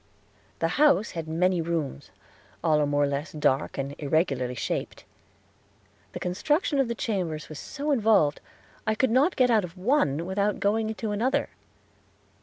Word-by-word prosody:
The 165 - +1
house 280 -7 +4
had 165 -2 -5
many 175 +2 +1
rooms, 160 - -3 0.5
all 155 -2 +3
more 145 0 +2
or - - +2
less 140 +3 -3
dark 150 -3 0
and 135 0 -3
irregularly 140 -4 0
shaped. - - -4 1.1
The - - -5
construction 290 - 0
of 270 - +2
the 235 - -3
chambers 180 -10 -3
was 155 -2 -8
so 295 +1 -4
involved, 215 - +3 0.5
I 215 - +2
could 255 +1 +1
not 275 +9 +3
get 250 -2 +3
out 220 -3 +4
of 180 +1 -8
one 180 - +1
without 200 +2 0
going 215 +2 +1
into 220 -1 -3
another. 255 +7 0
185 Hz, 155 wpm, -26 LUFS, 155-230 Hz, 1.1 s, house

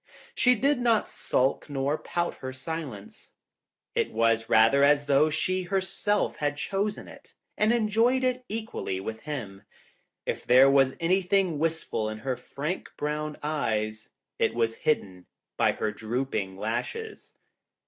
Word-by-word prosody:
She 250 0 +4
did 275 +4 +2
not 230 -3 +2
sulk 135 +3 0
nor 140 +1 0
pout 175 +2 -3
her 130 - -6
silence. 130 -6 -7 0.6
It - - +1
was 115 0 +3
82 115 - -14
rather 115 +6 +6
as 145 0 +4
though 145 +2 +4
she 185 +4 0
herself 195 +2 -1
had 145 0 -1
chosen 200 +5 -2
it - - -15 0.2
and 215 +1 +3
enjoyed 235 +3 +2
it 255 0 0
equally 215 - -4
with 110 +3 -5
him. 110 -9 -6 0.6
If - - -3
there 130 +3 +6
was 135 -1 +4
any 185 +3 +2
thing 180 -4 +1
wistful 160 -9 -1
in 110 - -5
her 130 +4 -2
frank, 145 +7 -5
brown 150 0 -3
eyes, 110 -8 -2 0.3
it - - +1
was 115 -1 +1
hidden 95 -11 -2 0.3
by - - +3
her 110 - -2
drooping 110 -4 -3
lashes. 120 - -4
145 Hz, 145 wpm, -27 LUFS, 115-190 Hz, 0.6 s, rather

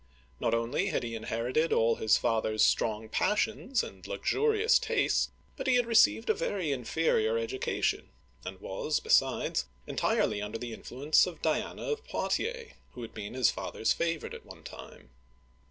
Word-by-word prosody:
Not 115 - +1
only 115 +11 0
had 195 - -1
he 115 -1 -4
inherited 115 +8 -1
all 115 0 +3
his 110 - +3
father's 110 -2 +1
strong 110 0 0
passions 220 - 0
and - - -10
luxurious 450 -2 +2
tastes, - - +1 0.3
but 265 -2 -5
he 255 - +4
had 245 -1 +3
received 110 - +4
a - - +4
very 170 -2 -2
inferior 125 -4 +1
education, 115 +3 -1 0.3
and - - -7
was, - - -2
besides, - - +2 0.2
entirely 105 - 0
under 105 +2 -4
the 120 0 -6
in - - -10
fluence 145 +8 +2
of 170 -3 -9
Diana 155 -1 -1
of 445 -1 -3
Poitiers, 470 -1 -2 0.2
who 120 - -8
had 115 - -9
been 105 +2 -7
his 130 -2 +4
father's 110 - -1
favorite 165 -2 -2
at - - -9
one - - -13
time. - - -11
130 Hz, 160 wpm, -30 LUFS, -, 0.3 s, he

